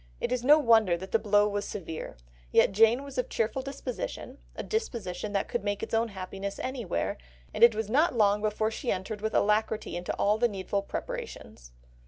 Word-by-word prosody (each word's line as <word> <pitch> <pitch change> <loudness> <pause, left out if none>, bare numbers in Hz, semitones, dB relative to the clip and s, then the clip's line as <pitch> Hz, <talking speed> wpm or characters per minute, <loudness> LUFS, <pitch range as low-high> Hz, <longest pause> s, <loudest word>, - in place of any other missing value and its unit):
It - - -2
is 250 -1 -1
no 295 +4 +7
wonder 225 - +4
that 190 +2 -9
the 225 - +3
blow 205 -1 +3
was 205 0 -2
severe, 165 - -6 0.3
yet - - +5
Jane 225 +6 +4
was 275 -2 -6
of 250 - -1
a - - -27
cheerful 225 +4 -1
disposition, 270 0 -6 0.2
a - - -5
disposition 225 - -3
that 200 - 0
could - - -3
make 205 0 -2
its - - -6
own 225 +1 +2
happiness 195 0 -6
anywhere, 250 - -3 0.3
and - - +1
it 235 -2 +8
was 220 -1 -2
not 285 +6 +2
long 205 -1 +3
before 215 +1 0
she 240 +2 -2
entered 200 +3 -4
with 220 0 -2
alacrity 215 +1 +1
into 175 0 -3
all 210 +2 +2
the 240 - +4
needful 200 -1 -2
preparations. - - -7
215 Hz, 200 wpm, -28 LUFS, 200-240 Hz, 0.3 s, it